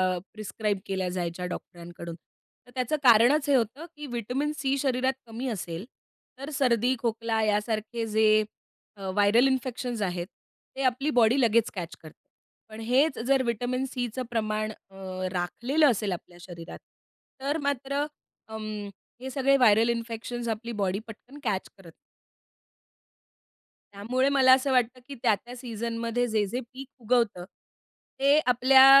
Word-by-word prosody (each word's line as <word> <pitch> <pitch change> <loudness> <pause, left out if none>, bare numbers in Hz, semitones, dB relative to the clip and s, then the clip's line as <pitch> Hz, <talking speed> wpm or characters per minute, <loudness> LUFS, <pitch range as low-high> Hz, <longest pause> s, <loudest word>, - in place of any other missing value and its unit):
अ, - - -3
prescribe 210 -1 -2
केल्या 190 -2 -2
जायच्या 180 0 -3
डॉक्टरांकडून. 170 -1 -7 0.5
तर - - -16
त्याचं 255 +4 0
कारणच 255 +5 +6
हे 275 - +5
होतं, 255 +7 0
की 295 0 -8
व्हिटॅमिन 250 +5 -2
सी 275 -1 0
शरीरात 260 -1 +1
कमी 235 +4 -5
असेल, 180 -2 -5 0.5
तर 275 +2 -6
सर्दी, 250 -1 +2
खोकला 225 -1 -1
यासारखे 215 +2 -1
जे 215 0 +4 0.5
अ, 190 -1 -5
व्हायरल 205 +6 +4
इन्फेक्शन्स 250 -3 -2
आहेत 180 -2 -2 0.5
ते 270 - -4
आपली 260 +4 +1
बॉडी 235 +4 +4
लगेच 230 -1 +3
कॅच 175 -2 -5
करते. 155 - -15 0.5
पण 215 +1 -10
हेच 265 +6 +2
जर 270 -1 +4
व्हिटॅमिन 245 +3 -1
सीचं 250 0 -3
प्रमाण 215 -1 -1 0.2
अ, 195 - -19 0.4
राखलेलं 245 - +1
असेल 205 -2 -1
आपल्या 175 0 -7
शरीरात, 170 -1 -9 0.6
तर 285 +3 0
मात्र 280 +1 -1 0.4
अं, 220 0 -7 0.6
हे 265 - -5
सगळे 275 +1 +3
व्हायरल 225 -1 +5
इन्फेक्शन्स 235 +1 -3
आपली 230 +2 -3
बॉडी 195 +1 0
पटकन 250 +6 -12
कॅच 200 -5 -1
करत 190 - -18
नाही. 165 - -11 2.0
त्यामुळे 250 +7 0
मला 265 -2 +6
असं 265 +1 +2
वाटतं 250 0 +2
की 280 - -7
त्या-त्या 240 +2 0
सीझन 230 -1 -4
मध्ये 235 +1 0
जे-जे 215 +2 0
पीक 270 0 -8
उगवतं, 230 -6 +1 0.7
ते 280 +2 +5
आपल्या 260 +2 +7
235 Hz, 140 wpm, -27 LUFS, 210-260 Hz, 2.0 s, आपल्या